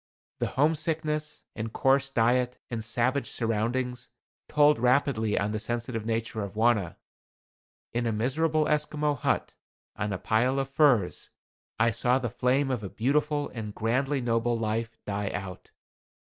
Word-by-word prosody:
The - - 0
homesickness, 155 +1 0
and 110 0 -4
coarse 135 +2 +2
diet 125 0 +2
and 115 -2 -3
savage 120 +3 0
surroundings 120 +2 -2 0.4
told 150 -2 +4
rapidly 125 -3 +2
on 100 +1 0
the 110 - -2
sensitive 115 0 -3
nature 115 -1 -2
of 100 -1 -6
Wauna. 110 -5 +2 1.0
In 120 0 0
a - - +1
miserable 155 +8 +1
Esquimaux 150 0 +1
hut, 140 - -1 0.4
on 105 - -2
a 95 - -1
pile 125 +8 +1
of 135 0 -2
furs, 135 - +2 0.5
I 115 +1 +4
saw 120 +3 +2
the 120 -3 -3
flame 130 +3 +1
of 125 -4 -1
a 100 - -5
beautiful 145 +6 0
and 105 -3 -6
grandly 130 +5 0
noble 115 0 +1
life 115 +1 -2
die 100 0 -2
out. 90 -2 -7
120 Hz, 145 wpm, -28 LUFS, 110-140 Hz, 1.0 s, told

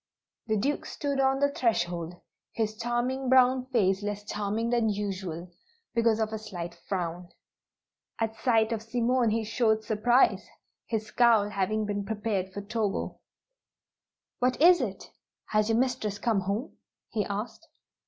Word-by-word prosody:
The 215 -1 +1
Duke 280 +8 -1
stood 280 -2 -2
on 270 0 +3
the 285 0 +2
threshold, 175 -9 -1 0.4
his 215 -1 -1
charming 240 +3 -1
brown 255 0 +4
face 200 -6 +2
less 205 0 -4
charming 210 +3 -2
than 235 -2 +2
usual, 190 -4 -4 0.4
because 230 -1 +2
of 220 0 -1
a 220 - -3
slight 175 -5 -6
frown. 175 -1 -4 0.9
At 225 -1 -1
sight 225 -3 +2
of 225 -2 -1
Simone 240 +1 +1
he 225 +1 0
showed 220 0 +1
surprise, 240 +4 +3 0.4
his 220 -2 -2
scowl 225 -2 +4
having 210 +2 0
been 205 -1 -2
prepared 205 -3 -2
for 200 - -5
Togo. 210 -1 -2 1.2
"What 250 0 +1
is 350 +1 +7
it? 200 -6 -5 0.4
Has 215 0 +2
your 225 - +3
mistress 240 -5 0
come 215 0 +1
home?" 200 +8 -3 0.3
he 215 - 0
asked. 210 +11 -5
220 Hz, 145 wpm, -28 LUFS, 200-240 Hz, 1.2 s, is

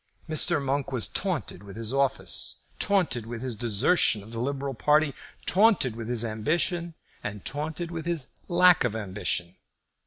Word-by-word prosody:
Mr. 155 -2 +4
Monk 140 0 -2
was 125 -4 +1
taunted 180 - -2
with 100 -1 -11
his 115 +2 -3
office, 135 0 +1 0.2
taunted 170 - +1
with 115 +1 -6
his 125 -3 -3
desertion 110 - +2
of 110 - -13
the 115 - -5
liberal 135 +2 -2
party, 150 +4 +2 0.3
taunted 190 - +3
with 115 -1 -6
his 120 -1 0
ambition, 165 - -1 0.3
and 105 -1 -6
taunted 160 +4 -3
with 165 -1 -5
his 165 -6 -2 0.2
lack 180 0 +6
of 120 -3 -1
ambition. 95 -4 -3
135 Hz, 155 wpm, -27 LUFS, 110-165 Hz, 0.3 s, lack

